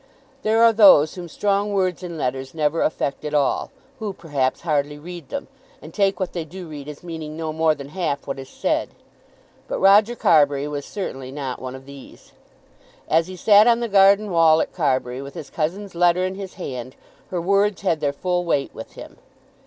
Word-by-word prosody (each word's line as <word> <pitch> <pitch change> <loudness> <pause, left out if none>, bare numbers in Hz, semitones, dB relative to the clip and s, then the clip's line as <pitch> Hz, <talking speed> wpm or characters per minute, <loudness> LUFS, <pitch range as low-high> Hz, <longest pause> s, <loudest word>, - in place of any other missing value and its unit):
There 220 +2 +3
are 230 -1 +6
those 190 -8 +7
whom 180 -2 -7
strong 205 +4 0
words 185 -2 0
in 175 -2 -6
letters 130 -1 -3
never 155 +1 0
affect 140 -3 -1
at 150 0 -3
all, 145 -2 +1 0.3
who, 210 -3 -4
perhaps, 145 -7 -2
hardly 150 -3 -1
read 175 +3 -10
them, 280 0 -5 0.3
and - - -12
take 195 -2 +1
what 185 -2 -3
they 170 - -3
do 175 +3 -10
read 145 -2 -9
as 150 +1 -9
meaning 160 -3 -7
no 160 -1 -3
more 160 0 +2
than 140 -1 -9
half 155 -5 -3
what 135 -1 -5
is 135 - -9
said. - - -1 0.8
But - - -3
Roger 205 +4 +5
Carbury 145 -7 +3
was 145 -1 -5
certainly 135 -10 -6
not 135 -3 -5
one 130 0 -6
of 130 0 -12
these. 140 -1 -14 0.8
As 165 +1 +2
he 185 - -8
sat 210 +3 +5
on 235 -1 +4
the 235 - -2
garden 200 0 +4
wall 165 -2 +5
at - - -2
Carbury, 130 -5 -1
with 140 0 -9
his 150 - -8
cousin's 185 +6 -3
letter 175 +1 +3
in 185 - -3
his 190 -1 -8
hand, 130 -7 -6 0.3
her 180 - -2
words 200 +3 +1
had 170 -5 +1
their 145 -2 0
full 180 +4 -1
weight 145 -5 -1
with - - -10
him. - - -11
165 Hz, 200 wpm, -22 LUFS, 145-195 Hz, 0.8 s, those